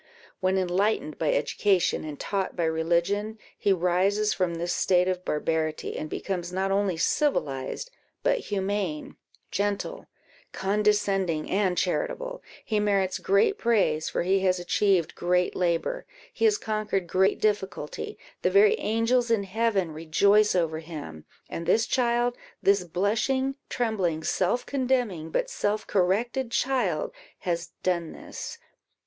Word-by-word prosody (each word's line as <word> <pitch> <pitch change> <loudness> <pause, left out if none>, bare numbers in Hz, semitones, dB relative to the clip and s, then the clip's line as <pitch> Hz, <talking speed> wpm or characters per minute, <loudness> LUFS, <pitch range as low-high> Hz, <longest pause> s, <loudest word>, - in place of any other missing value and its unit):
When, 185 0 +1
enlightened 200 +11 0
by - - +2
education 205 - +1
and 150 -2 -7
taught 195 -2 -2
by 175 - -1
religion, 170 +7 0 0.2
he 200 - +1
rises 190 +4 +2
from 180 -2 -1
this 175 +1 -2
state 180 -1 +3
of 185 -1 -1
barbarity, 155 0 -1
and 155 - -4
becomes 180 -1 -3
not 190 +1 -1
only 195 -3 +1
civilized, 220 - 0 0.3
but - - +2
humane, 195 -5 -2 0.4
gentle, 205 - -2 0.5
condescending, 195 -5 +1
and 190 -2 +1
charitable, - - -1 0.2
he 215 -2 0
merits 200 -2 +1
great 200 - +2
praise, 190 -10 +2
for - - -1
he 190 +2 +3
has 185 -1 +2
achieved 180 -1 +2
great 180 +1 +1
labour 175 - -1 0.3
he - - 0
has 425 -2 +4
conquered 215 - -2
great 190 +3 +2
difficulty; 210 - -2 0.2
the - - +2
very 425 +2 +6
angels 230 +3 +1
in 225 -3 +2
heaven 195 -3 0
rejoice 200 +7 +3
over 160 -3 0
him; 150 - -8 0.2
and 170 - -6
this 225 - +4
child, 240 -1 +1 0.3
this 200 -1 +4
blushing, 220 +10 0 0.2
trembling, 190 -9 -1
self 190 +9 0
condemning, 245 - -1
but - - 0
self 210 +1 -1
corrected 225 +7 +1
child, 235 - 0 0.3
has 170 -1 -3
done 170 -3 0
this. 465 - -8
195 Hz, 130 wpm, -27 LUFS, 175-220 Hz, 0.5 s, very